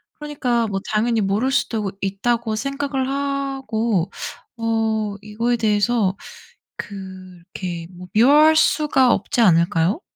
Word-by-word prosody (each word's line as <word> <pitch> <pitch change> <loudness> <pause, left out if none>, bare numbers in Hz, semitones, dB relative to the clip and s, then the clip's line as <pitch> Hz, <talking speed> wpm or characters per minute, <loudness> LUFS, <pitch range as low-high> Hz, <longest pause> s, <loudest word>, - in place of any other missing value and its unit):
그러니까 255 -6 -1
뭐 195 -2 -2
당연히 225 +2 +1
모를 210 +7 0
수도 220 -7 -1
있다고 220 +3 -1
생각을 275 +2 -2
하고 270 -8 -1 0.5
어 220 -2 -1
이거에 230 +3 -1
대해서 210 -2 +1 0.6
그렇게 185 -3 -8
뭐 180 +1 -10
미워할 295 +8 +6
수가 290 -5 +3
없지 205 +4 -2
않을까요? 175 - +3
225 Hz, 250 characters per minute, -21 LUFS, 195-260 Hz, 0.6 s, 미워할